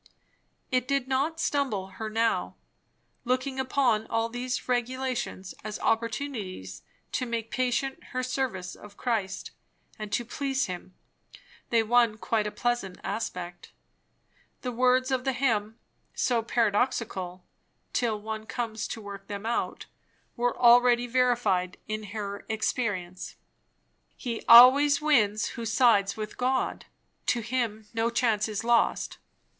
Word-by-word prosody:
It 255 -1 +1
did 275 -2 0
not 280 +5 0
stumble 260 -12 0
her 220 -1 -3
now. 225 +1 0 0.7
Looking 260 +2 -1
upon 255 -4 +1
all 225 0 0
these 245 +2 -3
regulations 245 -5 -2
as 215 0 -4
opportunities 220 - -2 0.3
to 250 - -1
make 230 -1 -3
patent 255 +2 -1
her 255 0 -3
service 235 -9 -2
of 205 -1 -14
Christ 215 -6 -2 0.5
and 215 -1 -6
to 240 - 0
please 275 +2 -1
him, 185 0 -7 0.7
they 230 -1 +3
won 230 -1 +3
quite 220 -1 0
a - - -4
pleasant 240 -7 -2
aspect. 180 -5 -5 0.9
The 250 - -3
words 255 +2 +2
of 260 -1 +1
the 265 0 0
hymn, 225 -4 0 0.4
so 240 -2 +1
paradoxical 210 -5 0 0.5
till 225 -4 0
one 220 +1 -6
comes 225 -3 -3
to 225 - -6
work 200 -1 -9
them 205 0 -6
out, 235 - -2 0.5
were 245 0 0
already 245 0 +6
verified 240 -7 +1
in 215 0 -3
her 200 -1 -5
experience 205 -5 -2 0.8
"He 235 -3 -4
always 275 +5 +9
wins 225 -9 +2
who 235 - -6
sides 225 -4 +3
with 215 -1 -6
God; 260 +1 0 0.4
To 240 - +2
him 230 -2 -2
no 225 0 +1
chance 225 -3 +1
is 210 0 -3
lost. 235 0 +1
230 Hz, 130 wpm, -28 LUFS, 210-255 Hz, 0.9 s, always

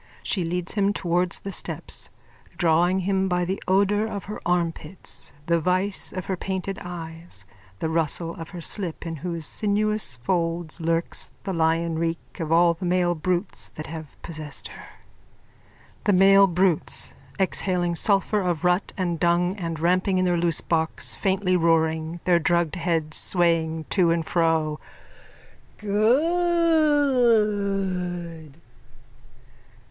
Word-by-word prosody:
She 185 - 0
leads 175 +1 -3
him 205 -1 +1
towards 175 -1 +1
the 195 - -5
steps, - - -1 0.5
drawing 175 +2 +3
him 190 0 0
by 180 0 +1
the 190 +2 -3
odour 200 +3 +2
of 200 -3 -5
her 210 - -7
armpits, 170 0 -2
the 170 0 +2
vice 185 +4 0
of 185 -1 -5
her 190 - -2
painted 190 +1 -4
eyes, 165 - -8 0.3
the 160 - -2
rustle 165 +1 -1
of 165 -1 -8
her 175 -2 -8
slip 175 -1 -2
in 165 -1 -4
whose 170 0 -3
sinuous 210 - 0
folds 165 +5 -2
lurks 165 +1 -1
the 195 - -3
lion 165 0 +1
reek 165 +2 -4
of 160 -2 -3
all 170 +1 +5
the 170 - -10
male 180 0 +2
brutes 180 +3 -2
that 155 - -6
have 160 -3 -9
possessed 155 -3 -6
her.)_ - - -12 1.2
THE 205 - +4
MALE 195 +1 +6
BRUTES: 180 -2 +2 0.2
_(Exhaling 180 -2 0
sulphur 200 +3 +2
of 175 -3 -1
rut 180 +2 +1
and 175 -3 -1
dung 175 +2 +2
and 165 -4 -4
ramping 185 +3 +2
in 185 - +2
their 175 -1 +2
loosebox, 165 -1 +1
faintly 190 -2 +1
roaring, 160 -1 +1
their 175 -2 +3
drugged 170 -1 +1
heads 165 -3 0
swaying 165 -3 +2
to 180 -4 +3
and 165 -1 +1
fro.)_ 160 -3 +1 1.0
Good! 215 - +1
175 Hz, 130 wpm, -24 LUFS, 165-195 Hz, 1.2 s, MALE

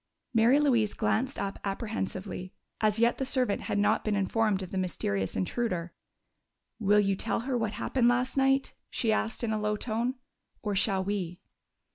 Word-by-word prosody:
Mary 235 +5 +5
Louise 240 -8 +2
glanced 260 +5 0
up 200 0 -3
apprehensively. 195 -3 -4 0.2
As 215 -1 +2
yet 235 +1 +3
the - - 0
servant 255 -5 +1
had - - -2
not 210 +2 +2
been 215 -1 0
informed 200 0 +1
of 185 - -8
the 190 - -3
mysterious 100 - -1
intruder. 175 - -2 0.9
"Will 210 -1 +4
you 195 -1 +2
tell 225 +4 -1
her 255 +2 -2
what 225 -3 -1
happened 240 +3 +1
last 245 +1 +2
night?" 270 0 +2 0.2
she 225 - 0
asked, 225 +2 -1
in 220 -2 0
a 215 - -1
low 210 0 +1
tone. 235 +3 -1 0.5
"Or 210 -2 -1
shall 195 -1 +2
we?" 185 -3 -3
215 Hz, 170 wpm, -29 LUFS, 195-240 Hz, 0.9 s, Mary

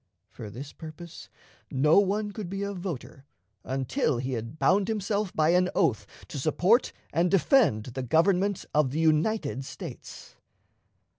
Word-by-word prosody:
For 105 - -8
this 135 +7 -9
purpose, 160 +1 -10 0.4
no 150 +7 +4
one 205 +1 0
could 205 -4 -6
be 195 +1 -3
a 200 0 -3
voter 175 -7 -6 0.4
until 135 - -1
he 130 +2 -3
had 115 +4 -5
bound 195 +4 +3
himself 210 -2 -1
by 155 0 +3
an 180 +1 +3
oath 105 -5 +1 0.2
to 145 - -5
support 180 - +2 0.2
and 175 +2 +2
defend 195 - +3
the 130 +1 -5
Government 180 - +2
of 150 -3 +3
the 145 +5 -3
United 155 -2 +1
States. - - -10
165 Hz, 145 wpm, -27 LUFS, 135-200 Hz, 0.4 s, no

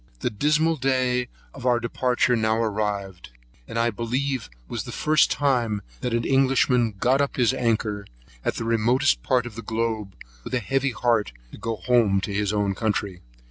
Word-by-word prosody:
The - - 0
dismal 150 +8 +2
day 125 -2 +1 0.3
of 130 - -10
our 125 -1 +3
departure 125 +1 +1
now 110 -1 +1
arrived. 105 -4 -2 0.4
This - - -5
I 115 0 +2
believe 125 - -2 0.2
was - - -4
the - - -7
first 155 0 +3
time 120 -7 0 0.2
that 125 - -2
an 115 - 0
Englishman 130 -3 +3
got 130 +6 +2
up 140 - -1
his 125 0 +3
anchor, 110 -5 -1 0.4
at - - -1
the - - -3
remotest 115 +5 +2
part 125 -2 +1
of 120 - -7
the 115 - -7
globe, 110 -3 -2 0.3
with - - -3
a - - +2
heavy 135 +4 0
heart, 115 - 0 0.2
to - - -11
go 115 0 -2
home 110 -5 +2
to 100 - -4
his 105 0 0
own 105 -2 0
country. 100 -4 -2
115 Hz, 180 wpm, -24 LUFS, 105-130 Hz, 0.4 s, our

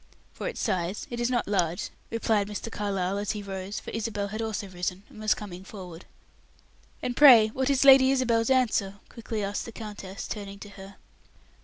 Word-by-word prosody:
"For - - -5
its - - -5
size; 180 +2 -1
it 240 - -4
is 240 0 +1
not 245 -2 0
large," 180 -4 0 0.2
replied 220 -3 +1
Mr. 210 +2 -5
Carlyle, 200 -2 -1
as 205 +1 -1
he 210 -1 -6
rose 195 0 -5
for - - -8
Isabel 210 -2 -3
had 215 +2 -4
also 220 -2 -3
risen 180 +1 -4
and - - -14
was 215 0 +2
coming 190 -3 -8
forward. 185 -4 -10 1.0
"And 245 - -2
pray 240 -7 +8
what 260 +4 -1
is 275 0 +3
Lady 265 -1 +8
Isabel's 240 -4 +2
answer?" 225 -7 +2
quickly 225 -2 -5
asked 200 +1 -3
the 230 - -8
countess, 205 -3 -7
turning 200 -2 -6
to 205 - -10
her. 195 -1 -12
210 Hz, 185 wpm, -27 LUFS, 195-230 Hz, 1.0 s, pray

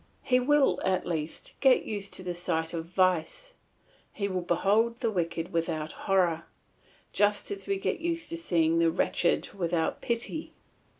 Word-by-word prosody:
He 250 -1 +3
will, 290 +2 +3
at 185 -1 +1
least, 160 -2 -4
get 265 -2 +4
used 205 -2 -4
to 185 - -7
the 180 -1 -3
sight 165 -2 -2
of 165 -1 -3
vice, 185 - 0 0.6
he 200 - -2
will 185 -2 -2
behold 205 +7 +2
the 230 -2 -1
wicked 170 -3 -2
without 160 -2 -1
horror, 175 -4 +1 0.7
just 205 0 +2
as 195 -1 -6
we 200 0 +1
get 190 -1 -2
used 335 0 -2
to 335 - -3
seeing 165 - +2
the 165 0 +4
wretched 170 +1 +1
without 170 -3 -1
pity. 240 +7 -3
185 Hz, 160 wpm, -29 LUFS, 170-230 Hz, 0.7 s, get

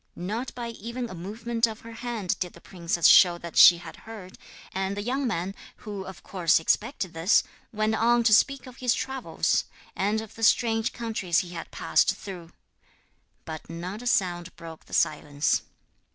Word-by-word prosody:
Not 220 +8 -4
by 240 -1 -5
even 235 +2 -6
a - - -7
movement 225 +6 -1
of 220 -1 -8
her 230 - -10
hand 225 -5 -3
did 180 0 -3
the - - -14
princess 170 -1 -3
show 175 -2 +7
that 170 -1 -9
she 175 - +9
had 175 - -10
heard, 210 -5 -11 0.3
and 190 +1 -2
the 205 - -3
young 260 +4 -1
man, 190 -3 -2 0.2
who 200 -3 -7
of 190 -2 -10
course 175 -4 +2
expected 200 - -1
this, 165 +5 +3 0.3
went 215 0 0
on 235 +2 +3
to 225 -2 +4
speak 275 +4 +3
of 255 -1 -12
his 250 -2 +1
travels 265 -1 -1 0.3
and 205 +3 0
of 220 -1 -9
the 225 - -12
strange 225 0 +3
countries 215 -7 -1
he - - -10
had 170 -1 -7
passed - - +2
through; 175 -4 -9 0.9
but 160 -1 -8
not 180 +6 -6
a 245 - -5
sound 175 -5 0
broke 165 -1 -11
the - - -16
silence. 145 -1 +1
205 Hz, 180 wpm, -26 LUFS, 175-230 Hz, 0.9 s, she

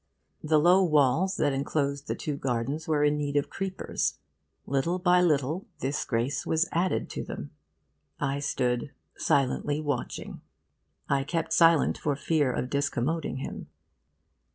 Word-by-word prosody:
The 155 0 +3
low 180 +5 +5
walls 155 +3 +3
that 145 -3 +2
enclosed 140 0 -1
the - - -1
two 150 - -3
gardens 135 +4 -2
were 150 -2 +2
in 150 0 +2
need 145 -1 -2
of 145 - 0
creepers. 190 -1 -2 0.5
Little 140 +6 0
by 180 0 +4
little, 160 - +1
this 135 +3 -2
grace 120 +4 -1
was 160 +2 +1
added 175 +2 0
to - - -4
them. - - -7 0.7
I 140 0 -1
stood 125 -1 -1 0.2
silently 140 +2 +1
watching. 145 -5 -4 0.7
I 140 -1 +1
kept 165 +3 -2
silent 165 -2 +4
for 145 -2 0
fear 145 -1 +1
of 125 +1 -3
discommoding 140 0 -1
him. - - -6
145 Hz, 140 wpm, -28 LUFS, 135-165 Hz, 0.7 s, low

